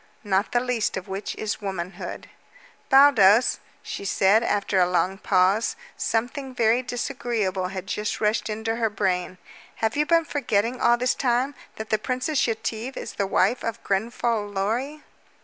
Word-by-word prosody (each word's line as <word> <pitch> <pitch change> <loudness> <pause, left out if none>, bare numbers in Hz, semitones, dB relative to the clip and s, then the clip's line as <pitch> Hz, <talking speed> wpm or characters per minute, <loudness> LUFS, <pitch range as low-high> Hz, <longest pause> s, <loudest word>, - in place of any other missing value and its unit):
"Not 200 -1 0
the 240 - +3
least 245 -5 -1
of 185 - -6
which 195 +1 -5
is 215 0 -4
womanhood." 190 -2 -5 0.6
"Baldos," 255 -6 +6 0.2
she - - -6
said 200 +2 +3
after 200 -3 0
a 180 -1 +3
long 185 +2 0
pause. 195 - +2 0.2
Something 255 +3 -2
very 230 +1 +3
disagreeable 225 -6 -2
had 185 0 -6
just 210 +1 -3
rushed 215 +1 0
into 220 +1 -2
her 225 -2 +1
brain. 185 -3 -1 0.4
"Have 220 0 -1
you 300 +1 +1
been 335 -1 +3
forgetting 240 -4 -1
all 240 - +4
this 250 +1 +1
time 255 +2 0 0.2
that 220 -1 -7
the 215 - +2
Princess 255 +5 0
Yetive 225 +2 -3
is - - -6
the 200 - -1
wife 245 +5 +1
of 230 -2 -4
Grenfall 220 +1 -1
Lorry?" 230 +10 -2
220 Hz, 155 wpm, -24 LUFS, 195-245 Hz, 0.6 s, Baldos